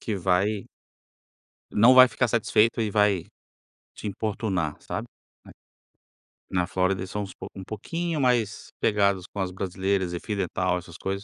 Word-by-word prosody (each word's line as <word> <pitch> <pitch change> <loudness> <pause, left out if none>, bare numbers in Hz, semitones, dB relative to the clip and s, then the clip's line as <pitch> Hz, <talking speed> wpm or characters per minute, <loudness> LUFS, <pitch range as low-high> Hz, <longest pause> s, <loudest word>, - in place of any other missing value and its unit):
que 110 - -3
vai 95 +3 0 1.1
não 120 +5 +7
vai 130 0 +10
ficar 125 -1 0
satisfeito 115 +1 +2
e 110 -2 0
vai 100 -4 +2 0.7
te - - -8
importunar 100 -6 -2
sabe, - - -5 1.4
na 90 -1 0
Flórida 95 0 0
eles 95 - -5
são 105 0 -3
uns 95 - -8
pouco - - -9
um 95 - -6
pouquinho 165 - -3
mais 120 -5 +1
pegadas 100 -3 +2
com 100 - -8
as 95 - -1
brasileiras 95 0 -1
e 85 - -3
fio 105 +2 -4
dental 90 -1 0
essas 90 -1 -9
coisas, 100 +1 -3
100 Hz, 155 wpm, -26 LUFS, 95-110 Hz, 1.4 s, vai